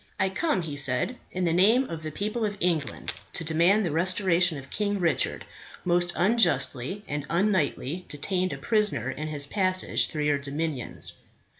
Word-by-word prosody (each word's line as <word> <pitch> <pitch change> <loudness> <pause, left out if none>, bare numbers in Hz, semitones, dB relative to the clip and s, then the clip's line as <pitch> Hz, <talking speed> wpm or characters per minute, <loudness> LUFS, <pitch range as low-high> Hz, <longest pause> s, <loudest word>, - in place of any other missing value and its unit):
"I 190 -1 +3
come," 190 - 0
he 150 -3 -5
said, 140 - 0
"in 185 0 -1
the 165 - +2
name 215 +9 +5
of 165 -1 -6
the 155 - -4
people 210 +7 -2
of 205 -1 -1
England 165 -5 -1 0.2
to - - -3
demand 170 +6 +3
the 170 - -1
restoration 180 0 +2
of 135 -1 -10
King 205 -1 0
Richard, 170 -2 0 0.4
most 175 0 +3
unjustly 190 - +1
and 145 0 -3
unknightly 175 -3 0
detained 185 +5 -1
a - - -4
prisoner 215 -2 0
in 155 - -5
his 145 -2 -3
passage 185 +3 +1
through 150 -3 -3
your 150 -1 +2
dominions." 140 -2 -3
175 Hz, 165 wpm, -27 LUFS, 150-195 Hz, 0.4 s, name